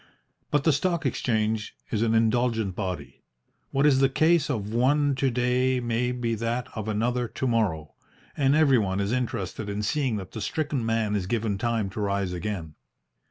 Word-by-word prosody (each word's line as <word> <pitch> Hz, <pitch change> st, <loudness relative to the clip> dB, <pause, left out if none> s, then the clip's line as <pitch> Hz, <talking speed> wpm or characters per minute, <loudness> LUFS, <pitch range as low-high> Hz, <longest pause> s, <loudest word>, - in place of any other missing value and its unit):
But 145 Hz, -2 st, +1 dB
the 160 Hz, -, +4 dB
Stock 170 Hz, +2 st, 0 dB
Exchange 110 Hz, -4 st, -1 dB, 0.2 s
is 110 Hz, -, 0 dB
an 115 Hz, -1 st, +2 dB
indulgent 115 Hz, -3 st, +1 dB
body. 90 Hz, -8 st, -5 dB, 0.5 s
What 135 Hz, +2 st, +1 dB
is 140 Hz, -3 st, +5 dB
the 135 Hz, 0 st, +4 dB
case 155 Hz, +2 st, +3 dB
of 110 Hz, -5 st, -2 dB
one 140 Hz, +4 st, +3 dB
to 135 Hz, 0 st, +1 dB
day 125 Hz, +1 st, +1 dB
may 120 Hz, +1 st, 0 dB
be 120 Hz, -2 st, -2 dB
that 115 Hz, +2 st, -2 dB
of 110 Hz, -1 st, -4 dB
another 120 Hz, +3 st, 0 dB
to 130 Hz, -, -4 dB
morrow, 95 Hz, -, 0 dB, 0.4 s
and 140 Hz, 0 st, +3 dB
everyone 120 Hz, -11 st, +3 dB
is 100 Hz, +1 st, -1 dB
interested 110 Hz, -4 st, -2 dB
in 100 Hz, +1 st, -3 dB
seeing 130 Hz, +1 st, 0 dB
that 95 Hz, -2 st, -7 dB
the 110 Hz, -, -6 dB
stricken 145 Hz, +4 st, -2 dB
man 115 Hz, -2 st, 0 dB
is 95 Hz, -3 st, -2 dB
given 110 Hz, -2 st, -1 dB
time 115 Hz, -3 st, -1 dB
to 110 Hz, -, -6 dB
rise 100 Hz, -2 st, -1 dB
again. 90 Hz, -4 st, -4 dB
115 Hz, 175 wpm, -26 LUFS, 105-130 Hz, 0.5 s, is